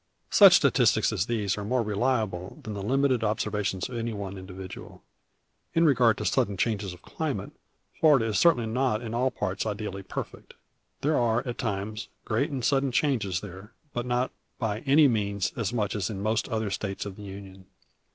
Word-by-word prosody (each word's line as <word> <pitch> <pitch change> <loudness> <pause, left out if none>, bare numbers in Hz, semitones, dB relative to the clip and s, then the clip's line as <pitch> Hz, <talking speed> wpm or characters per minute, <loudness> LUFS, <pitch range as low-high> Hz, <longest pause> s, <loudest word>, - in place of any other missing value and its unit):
Such - - +9
statistics - - +3
as 90 - -1
these 105 -4 -1
are - - -4
more 120 +3 +1
reliable 105 -4 -1
than 110 - -5
the 100 - -5
limited 130 +2 +1
observation 105 -3 -1
of 125 - -8
any 115 0 -2
one 100 -2 -5
individual. 95 0 -9 0.7
In 165 0 +4
regard 125 -7 +4
to - - -4
sudden 100 -1 +1
changes 100 -2 -1
of 90 - -13
climate, - - -4 0.5
Florida 145 -8 +5
is 110 -2 0
certainly 145 -9 +4
not 120 0 0
in 115 -1 -5
all 125 +3 +2
parts 100 -5 -3
ideally 105 -2 -4
perfect. 95 - -7 0.5
There 150 +1 +2
are, 120 +2 +1
at 120 - -4
times, 105 0 -3 0.2
great 140 +4 0
and 135 -5 -3
sudden 135 -2 +2
changes 115 - 0
there, 95 +2 -10 0.2
but 120 0 -3
not 125 +1 0 0.3
by 110 -3 -2
any 145 +2 +6
means 100 -5 0
as 115 -3 -2
much 105 -4 -1
so - - -2
as 90 - -1
in 100 -2 -5
most 110 +1 0
other 110 -3 -1
States 100 0 -3
of 100 -2 -6
the 105 - -12
Union. 95 -1 -10
110 Hz, 185 wpm, -27 LUFS, 100-125 Hz, 0.7 s, Such